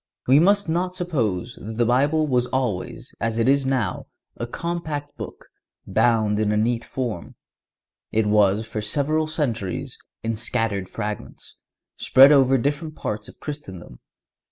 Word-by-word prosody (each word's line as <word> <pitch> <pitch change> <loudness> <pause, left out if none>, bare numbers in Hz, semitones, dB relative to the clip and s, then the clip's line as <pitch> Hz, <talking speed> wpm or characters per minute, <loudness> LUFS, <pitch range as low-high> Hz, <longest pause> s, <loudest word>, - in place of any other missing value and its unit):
We 135 +3 +6
must 200 +4 +4
not 180 +3 -1
suppose 120 - -2
that 110 - -6
the 120 +1 +1
Bible 145 +6 +3
was 125 -4 +1
always, 125 -9 -3
as 115 0 -1
it 115 +1 +2
is 135 0 +3
now, 125 -8 -1 0.3
a 120 - -4
compact 155 -1 -4
book, - - -9 0.4
bound 110 -3 +2
in 105 -1 +1
a 105 - +1
neat 115 +2 +1
form. 120 -10 -5 0.8
It 110 0 +2
was 105 0 +3
for 110 -1 -4
several 150 +8 0
centuries 120 - -3 0.2
in 115 0 -1
scattered 105 -4 -1
fragments, 105 -1 -6 0.4
spread 135 +2 +7
over 135 -2 +5
different 145 +4 -2
parts 105 0 -4
of - - -15
Christendom. 95 - -8
120 Hz, 145 wpm, -23 LUFS, 105-145 Hz, 0.8 s, spread